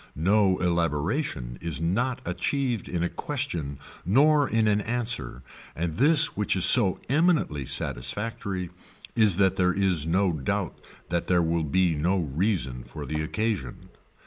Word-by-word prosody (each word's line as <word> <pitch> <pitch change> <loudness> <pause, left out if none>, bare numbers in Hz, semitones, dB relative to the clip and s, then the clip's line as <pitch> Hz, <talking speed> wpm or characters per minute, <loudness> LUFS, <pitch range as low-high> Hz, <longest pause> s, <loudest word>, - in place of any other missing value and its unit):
No 95 +3 +2
elaboration 85 - -2
is 85 -4 -3
not 120 +10 -1
achieved 130 -7 -2
in 85 -1 -2
a - - +1
question 85 - -4 0.3
nor 145 - +3
in 110 -1 +1
an 105 0 +2
answer 110 - -3 0.3
and 80 0 -3
this 155 +3 +4
which 105 -1 0
is 95 - +4
so 100 -7 +7
eminently 145 - +1
satisfactory 95 - -3 0.4
is 105 -6 +4
that 95 -1 +2
there 90 -1 +2
is 90 -5 +1
no 90 +1 +1
doubt 70 -4 -3 0.3
that 85 0 -2
there 90 -1 +2
will 85 0 0
be 85 +4 +1
no 85 +6 0
reason 80 - -2
for - - -9
the 75 0 -3
occasion. 95 - -3
90 Hz, 145 wpm, -26 LUFS, 80-110 Hz, 0.4 s, so